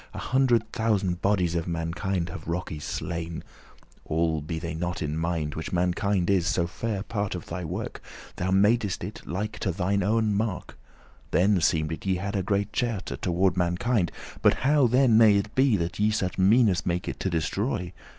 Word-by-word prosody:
A - - -5
hundred 120 -4 +1
thousand 105 -6 0
bodies 95 -4 +2
of 85 0 -2
mankind 85 +2 -2
Have 80 -2 -8
rockes 85 -3 -4
slain, 85 -2 -4 0.6
*all 80 -1 0
be 80 +2 -4
they 85 0 -4
not 90 +1 -3
in 75 0 -2
mind;* - - -2
*though 85 -1 0
they 75 0 -3
are - - -9
Which 80 - -5
mankind 90 +1 +1
is 95 -4 +2
so 85 - +1
fair 100 +4 -3
part 100 -4 -3
of 90 - -6
thy 90 +2 -5
work, 90 +7 -5
forgotten* - - -15
Thou 95 +1 -1 0.2
madest 110 -5 0
it - - -6
like 100 +6 -3
to 95 - 0
thine 100 +3 0
owen 110 +2 +2
mark.* 105 -3 -2
*image - - -22 0.5
Then 95 0 +3
seemed 80 -1 +1
it 80 - -6
ye 95 - +2
had 100 +3 -3
a 100 - +1
great 100 +1 -1
cherte* - - +1
*love, - - -3
affection - - -6
Toward 90 +1 +1
mankind; 90 +3 +1 0.3
but - - +5
how 145 -2 +5
then 125 -2 +4
may 110 -3 +7
it 100 +2 -1
be 130 -5 +3
That 85 +1 -3
ye 105 +1 +3
such 95 -4 -1
meanes 100 -1 +4
make 90 0 -2
it - - -4
to 95 - -1
destroy? 90 - -2
95 Hz, 210 wpm, -26 LUFS, 85-105 Hz, 0.6 s, may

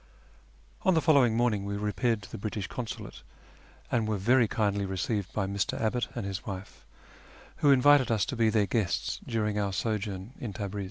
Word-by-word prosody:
On 190 -4 +3
the - - +5
following 135 -9 +4
morning 115 -4 +1
we 100 0 -3
repaired 105 +2 0
to - - -12
the - - -6
British 105 -1 -3
Consulate, 115 +3 -6 0.7
and 115 -2 +1
were 110 -1 0
very 120 +4 +4
kindly 100 -2 0
received 95 +1 -2
by 100 - -1
Mr. 100 0 -2
Abbott 115 +1 0
and 120 -5 -3
his 95 -1 -4
wife, 100 -1 -8 0.7
who 145 - +3
invited 140 -1 +6
us 110 -3 +2
to 135 - -4
be 115 -2 +3
their 105 -2 +2
guests 100 -4 -1
during 105 -2 0
our 100 -1 0
sojourn 105 +1 -3
in 110 -5 -5
Tabriz. 100 -1 -4
105 Hz, 180 wpm, -29 LUFS, 100-120 Hz, 0.7 s, invited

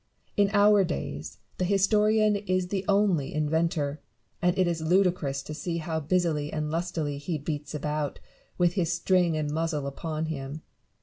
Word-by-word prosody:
In 200 -1 +3
our 205 -1 +5
days, 70 - -4 0.2
the - - +1
historian 210 +3 +3
is 185 -3 -1
the 195 -1 -1
only 195 -9 +2
inventor; 155 -1 0 0.4
and 180 0 +2
it 185 - +4
is 170 -2 -1
ludicrous 165 -5 +1
to 155 - -7
see 170 +2 -3
how 160 -1 -2
busily 155 -2 0
and 150 -1 -2
lustily 160 -4 -2
he 155 +3 -3
beats 150 0 -4
about, 150 -1 -2 0.4
with 175 -1 +3
his 175 -4 0
string 175 -1 +2
and 150 -1 -1
muzzle 160 -2 -1
upon 155 +3 -3
him. 150 -1 -5
165 Hz, 160 wpm, -27 LUFS, 150-185 Hz, 0.4 s, our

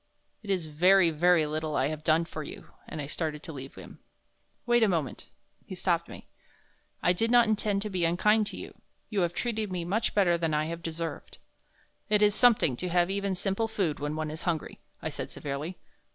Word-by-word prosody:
"It 205 - -11
is 185 -4 0
very, 170 +3 +4
very 170 +1 +4
little 155 0 -3
I 135 - +2
have 155 0 -5
done 160 +1 +3
for 155 -1 -6
you," 150 - -10 0.2
and 155 - -6
I 145 - -3
started 155 0 -4
to 160 - -7
leave 135 -1 -8
him. - - -12 0.7
"Wait 240 0 +3
a 220 - +5
moment" 160 -7 -2 0.3
he - - -8
stopped - - 0
me. - - -11 0.8
"I 180 - +4
did 225 +6 0
not 240 -1 +6
intend 210 -2 +1
to 210 - -4
be 180 -2 -1
unkind 210 +6 +3
to - - -6
you. - - -10 0.3
You 210 - 0
have 175 -1 0
treated 220 -4 -2
me 175 -2 -3
much 215 +6 0
better 175 -4 +3
than 160 -2 0
I 150 +1 +1
have 170 +1 -5
deserved." 165 -3 -5 0.7
"It 210 0 +4
is 205 0 +5
something 215 - +4
to 180 - -3
have 175 +1 +2
even 200 -1 -1
simple 195 +4 0
food 195 -9 -1
when 145 +1 -3
one 155 -1 -3
is 155 +2 -7
hungry," 170 -3 -3 0.2
I - - -1
said, - - -6
severely. 145 +5 -5
175 Hz, 210 wpm, -28 LUFS, 155-200 Hz, 0.8 s, not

